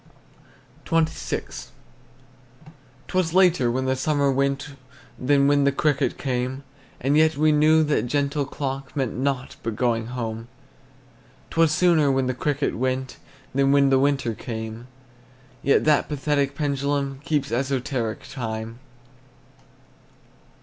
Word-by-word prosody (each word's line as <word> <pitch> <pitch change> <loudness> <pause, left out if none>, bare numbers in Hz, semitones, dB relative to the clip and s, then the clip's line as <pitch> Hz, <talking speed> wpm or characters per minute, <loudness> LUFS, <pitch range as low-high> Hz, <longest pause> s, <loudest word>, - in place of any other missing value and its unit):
XXVI. 160 -1 -2 1.4
'T - - -11
was 180 -2 +1
later 180 -9 +4
when 130 +2 -1
the 130 0 +1
summer 140 +1 +1
went 140 +2 0 0.5
Than 140 +2 +3
when 145 0 +3
the 140 - +3
cricket 140 -1 0
came, 130 +1 -3 0.4
And 135 +3 +1
yet 155 -1 +4
we 155 +1 +4
knew 155 +1 +4
that 145 -4 0
gentle 140 +2 0
clock 135 -1 -5
Meant 135 -5 -1
nought 130 0 -2
but 115 -2 -3
going 115 -1 0
home. 115 -2 -5 1.0
'T - - -3
was 165 -2 +5
sooner 155 -4 +3
when 135 -1 +1
the 130 - -1
cricket 145 +3 -1
went 130 +1 -2 0.4
Than 135 +1 +3
when 140 -1 +4
the 135 - +4
winter 140 -4 +1
came, 110 +1 -7 0.7
Yet 140 - +3
that 150 -1 +3
pathetic 140 -1 0
pendulum 140 -1 -1
Keeps 150 -2 -1
esoteric 125 -2 -2
time. 115 -2 -5
140 Hz, 130 wpm, -24 LUFS, 125-145 Hz, 1.4 s, was